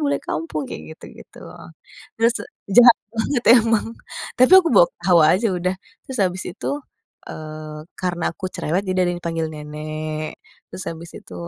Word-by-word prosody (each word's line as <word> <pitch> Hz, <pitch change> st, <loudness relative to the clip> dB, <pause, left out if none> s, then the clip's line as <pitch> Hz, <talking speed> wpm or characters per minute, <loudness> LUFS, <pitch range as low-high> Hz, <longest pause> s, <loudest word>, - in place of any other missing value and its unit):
bule 140 Hz, -1 st, +1 dB
kampung," 155 Hz, -2 st, -3 dB
kayak -, -, -7 dB
gitu-gitu. -, -, -14 dB, 0.8 s
Terus 230 Hz, +1 st, +3 dB, 0.4 s
jahat 240 Hz, +2 st, +8 dB, 0.2 s
banget 235 Hz, +3 st, -1 dB, 0.2 s
emang, 225 Hz, -1 st, +1 dB, 0.5 s
tapi 255 Hz, +7 st, +5 dB
aku 360 Hz, -3 st, +6 dB
bawa -, -, +7 dB
ketawa 175 Hz, -4 st, +4 dB
aja 225 Hz, +5 st, 0 dB
udah, 180 Hz, +1 st, -1 dB, 0.3 s
terus 260 Hz, -2 st, -5 dB
habis 185 Hz, +1 st, -2 dB
itu, 180 Hz, -, -6 dB, 0.6 s
eee, 155 Hz, 0 st, -8 dB, 0.2 s
karena 175 Hz, -2 st, -2 dB
aku 185 Hz, -, -6 dB
cerewet, 175 Hz, +6 st, -1 dB
jadi 185 Hz, 0 st, 0 dB
ada 175 Hz, -, +1 dB
yang 175 Hz, -, -7 dB
panggil 165 Hz, -1 st, -1 dB
"nenek," 155 Hz, +1 st, -5 dB, 0.4 s
terus 185 Hz, -, -6 dB
habis 165 Hz, 0 st, -8 dB
itu 90 Hz, -, -13 dB
175 Hz, 150 wpm, -21 LUFS, 155-220 Hz, 0.8 s, jahat